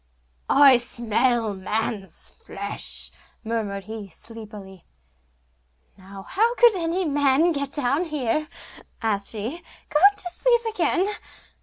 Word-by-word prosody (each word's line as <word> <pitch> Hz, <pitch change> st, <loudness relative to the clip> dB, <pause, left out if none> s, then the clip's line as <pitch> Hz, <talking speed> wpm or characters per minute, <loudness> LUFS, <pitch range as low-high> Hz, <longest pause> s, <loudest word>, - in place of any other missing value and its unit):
'I 275 Hz, -2 st, +7 dB
smell 235 Hz, -1 st, 0 dB
man's 200 Hz, +1 st, -3 dB
flesh!' 460 Hz, -, -4 dB, 0.3 s
murmured 215 Hz, -3 st, -3 dB
he, 215 Hz, 0 st, -7 dB
sleepily. 205 Hz, -2 st, -10 dB, 1.1 s
'Now, 195 Hz, 0 st, -11 dB
how 450 Hz, -, +1 dB
could 475 Hz, -4 st, +6 dB
any 350 Hz, +1 st, -1 dB
man 290 Hz, +2 st, +3 dB
get 280 Hz, -3 st, -3 dB
down 290 Hz, +5 st, +1 dB
here?' 300 Hz, -1 st, -1 dB, 0.6 s
asked 205 Hz, -3 st, 0 dB
she; 225 Hz, +9 st, -4 dB, 0.3 s
'go 300 Hz, -, +2 dB, 0.2 s
to 355 Hz, -, -4 dB
sleep 475 Hz, +5 st, +2 dB
again. 380 Hz, -4 st, +2 dB
245 Hz, 110 wpm, -24 LUFS, 210-320 Hz, 1.1 s, I